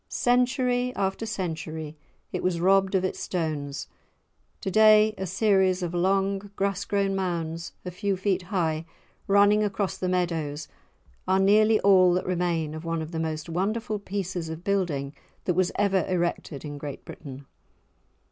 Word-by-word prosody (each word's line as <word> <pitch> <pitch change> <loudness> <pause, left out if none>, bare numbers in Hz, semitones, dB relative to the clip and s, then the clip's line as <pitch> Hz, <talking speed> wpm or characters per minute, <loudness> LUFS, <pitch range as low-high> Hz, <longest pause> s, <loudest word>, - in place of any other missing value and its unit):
Century 250 0 +1
after 195 +3 -1
century 160 -6 -4 0.4
it 180 - -3
was 180 -2 0
robbed 195 +2 +3
of 185 - +2
its 185 - -3
stones; 150 -5 -3 0.7
to 190 - -3
day 215 +1 +6
a 190 - -4
series 190 -1 +2
of 175 0 -3
long 195 +2 +1
grass 195 -1 -1
grown 195 -1 0
mounds, 170 -3 -3
a 180 - -4
few 195 +1 -1
feet 185 0 0
high, 170 -4 -1 0.4
running 205 +1 +5
across 200 -1 -1
the 185 - -2
meadows, 165 -5 -1 0.6
are 190 - +3
nearly 215 +3 +5
all 185 -3 +6
that 180 - 0
remain 170 -4 -1
of 155 +1 -7
one 165 -1 -2
of 155 - -8
the 165 - -3
most 155 -1 -3
wonderful 210 +6 -2
pieces 185 -4 -4
of 160 +1 -7
building 175 -9 -1 0.3
that 180 - +2
was 185 +1 +1
ever 195 -3 +2
erected 175 -5 -2
in 145 -1 -6
Great 145 -1 -7
Britain. 140 -2 -9
185 Hz, 155 wpm, -26 LUFS, 165-200 Hz, 0.7 s, day